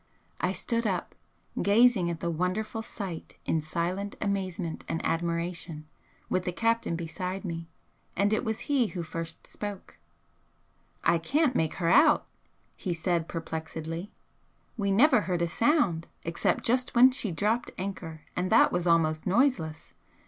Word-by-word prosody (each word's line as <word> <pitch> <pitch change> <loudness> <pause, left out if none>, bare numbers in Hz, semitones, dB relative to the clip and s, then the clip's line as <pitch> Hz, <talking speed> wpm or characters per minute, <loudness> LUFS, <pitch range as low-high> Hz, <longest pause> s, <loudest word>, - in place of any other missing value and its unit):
I - - +1
stood 230 +5 -1
up, 185 -4 -2 0.5
gazing 205 -2 +4
at 170 -1 -4
the 170 - -1
wonderful 185 +7 -1
sight 195 -7 -7
in 160 - +1
silent 175 +6 -2
amazement 185 -4 -2
and 165 - -1
admiration, 170 -1 -2 0.4
with 185 -1 0
the 180 - 0
captain 230 -2 +1
beside 180 +4 -4
me, 165 -2 -5 0.5
and 200 +3 +2
it 215 - +1
was 220 -1 -2
he 275 -6 +2
who 180 -4 -5
first 165 0 -6
spoke. 200 - -7 1.0
"I 170 - +4
can't 280 - +1
make 160 -1 +1
her 170 -3 0
out," 300 - +6 0.5
he 180 -3 -3
said, 170 0 0
perplexedly, 160 +2 -5 0.7
"We 200 -4 -1
never 245 +4 +5
heard 180 -3 -1
a - - +1
sound 195 - +2 0.2
except 165 +1 0
just 250 +2 +1
when 255 +2 +8
she 230 -6 -1
dropped 215 +8 0
anchor, 175 -5 -5
and 185 +2 -1
that 225 - +6
was 175 0 0
almost 160 -1 +2
noiseless. 185 - +1
180 Hz, 145 wpm, -28 LUFS, 165-220 Hz, 1.0 s, when